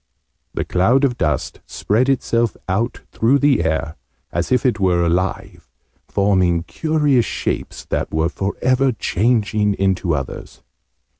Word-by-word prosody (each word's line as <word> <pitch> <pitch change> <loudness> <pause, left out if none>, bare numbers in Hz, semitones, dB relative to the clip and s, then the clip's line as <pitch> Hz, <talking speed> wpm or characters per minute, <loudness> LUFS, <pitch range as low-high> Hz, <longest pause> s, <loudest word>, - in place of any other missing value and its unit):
The - - -2
cloud 115 +10 +2
of 130 -3 +2
dust 75 - -2
spread 120 +6 0
itself 120 -4 0
out 110 +6 -1
through 120 +5 +3
the 140 - +3
air, 80 0 -2 0.3
as - - -2
if 125 -1 +2
it 120 -4 +2
were 90 -3 +2
alive, 90 +3 -2 0.4
forming 95 -4 +2
curious 150 - +1
shapes - - -4
that - - -2
were 80 +1 +1
for 95 +3 -3
ever 130 +1 +3
changing 105 0 +1
into 95 -4 0
others. 70 -3 -7
105 Hz, 135 wpm, -19 LUFS, 90-125 Hz, 0.4 s, through